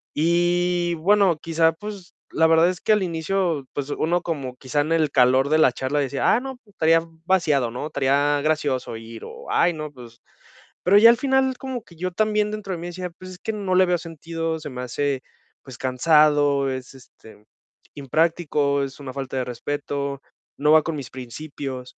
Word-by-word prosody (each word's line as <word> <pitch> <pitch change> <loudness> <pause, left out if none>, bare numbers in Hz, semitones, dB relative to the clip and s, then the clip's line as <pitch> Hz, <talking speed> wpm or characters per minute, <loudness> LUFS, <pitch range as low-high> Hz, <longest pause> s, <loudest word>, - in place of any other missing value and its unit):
Y 175 +1 +1
bueno, 190 0 +3
quizá, 165 0 +2
pues 200 0 -9 0.2
la 160 +1 +3
verdad 165 +1 +5
es 185 - -5
que - - +1
al 210 -2 +3
inicio, 165 -3 -1
pues 145 0 -4
uno 175 +2 0
como 140 -8 -4
quizá 145 +2 -1
en 155 +3 -3
el 160 -2 +2
calor 130 +2 +4
de 155 - +4
la 145 -5 +5
charla 130 +4 -2
decía: 140 0 +1
"Ah, 225 - +3
no, 265 0 -7
estaría 165 -4 +2 0.2
vaciado, 155 -9 +2
¿no? 125 +5 -4
Estaría 145 +1 +1
gracioso 145 -6 -1
ir" 115 0 -10
o - - -11
"Ay, 175 0 +3
no, 155 -1 -6
pues". 120 -3 -14 0.6
Pero 195 +3 +5
ya 230 +3 +9
al 235 - +5
final 265 -1 +1
como 260 -4 -5
que 170 - -18
yo 185 +3 -3
también 210 +2 +1
dentro 205 -3 -5
de - - -4
mí 175 - -6
decía, 180 +1 -5
pues 185 +2 -12
es 180 - -11
que 220 - -3
no 200 -3 -2
le 185 0 +6
veo 180 0 +1
sentido, 165 0 -4
se 150 -1 -7
me 125 0 -6
hace 135 +1 -2 0.4
pues 130 -3 -11
cansado, 145 +1 +3
es, 130 0 -6
este, 110 -4 -17 0.5
impráctico, 145 -1 0
es 135 +1 -7
una 140 -2 -7
falta 135 -1 -5
de 125 - -1
respeto, 140 +2 -4 0.4
no 150 +2 +3
va 155 - +6
con 165 0 -3
mis 135 -4 -7
principios. 130 0 -7
155 Hz, 190 wpm, -23 LUFS, 140-175 Hz, 0.6 s, ya